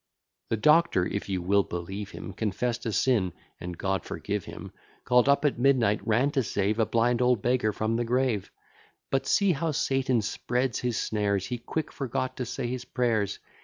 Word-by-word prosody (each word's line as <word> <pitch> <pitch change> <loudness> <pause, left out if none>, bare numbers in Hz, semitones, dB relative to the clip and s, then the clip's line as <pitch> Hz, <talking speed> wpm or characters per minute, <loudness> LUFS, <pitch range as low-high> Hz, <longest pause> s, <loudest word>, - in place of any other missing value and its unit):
The 115 - 0
Doctor, 150 - +4
if 100 +1 -4
you 95 -2 -1
will 100 +3 +4
believe 95 +3 -5
him, 95 - -8
Confess'd 115 +4 -2
a - - 0
sin; 105 -5 +2 0.3
(and 90 0 -6
God 95 -2 -1
forgive - - -4
him!) - - -9 0.3
Call'd 125 +2 +4
up 140 +1 +3
at 140 -4 +1
midnight, 120 -6 +3
ran 120 +6 +3
to 135 - +1
save 105 -1 -1
A 110 - +3
blind 120 +1 +2
old 125 -4 +2
beggar 125 -3 +2
from 110 +2 -1
the 120 - 0
grave: 120 -4 0 0.6
But 135 0 0
see 200 -2 +3
how 165 +1 -1
Satan 135 -5 +1
spreads 125 +3 -1
his 120 -2 -1
snares; 100 -3 0
He 125 -1 -4
quite 155 +6 -4
forgot 130 -1 -3
to 125 - -3
say 125 +2 -4
his 125 +1 -3
prayers. 115 -5 0
120 Hz, 185 wpm, -27 LUFS, 105-130 Hz, 0.6 s, Doctor